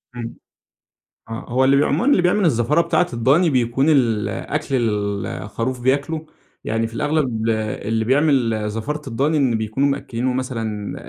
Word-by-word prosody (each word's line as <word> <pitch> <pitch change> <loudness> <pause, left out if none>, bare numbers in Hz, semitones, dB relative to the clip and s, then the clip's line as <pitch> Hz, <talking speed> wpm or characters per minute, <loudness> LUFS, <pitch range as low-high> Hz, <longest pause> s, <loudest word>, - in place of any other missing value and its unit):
إمم، 115 -1 -6 0.9
آه، 115 +4 -6
هو 130 +2 +2
اللي 135 +1 +4
بي 140 - +4
عمومًا 160 - 0
اللي 185 - +4
بيعمل 180 +3 +2
الزفارة 145 +2 +2
بتاعة 180 +1 +1
الضاني، 135 +9 +3
بيكون 130 +2 +1
الأكل 135 +2 0
اللي 100 -5 -2
الخروف 115 +5 -3
بياكله، 140 +5 0 0.4
يعني 115 +1 -1
في 115 - -13
الأغلب 130 -5 0
اللي 110 0 -1
بيعمل 125 -6 +2
زفارة 125 +8 -4
الضاني 140 +6 0
إن 130 -5 +2
بيكونوا 110 +6 0
مأكلينه 130 -2 -2
مثلًا 115 -5 -3
125 Hz, 145 wpm, -20 LUFS, 115-145 Hz, 0.9 s, اللي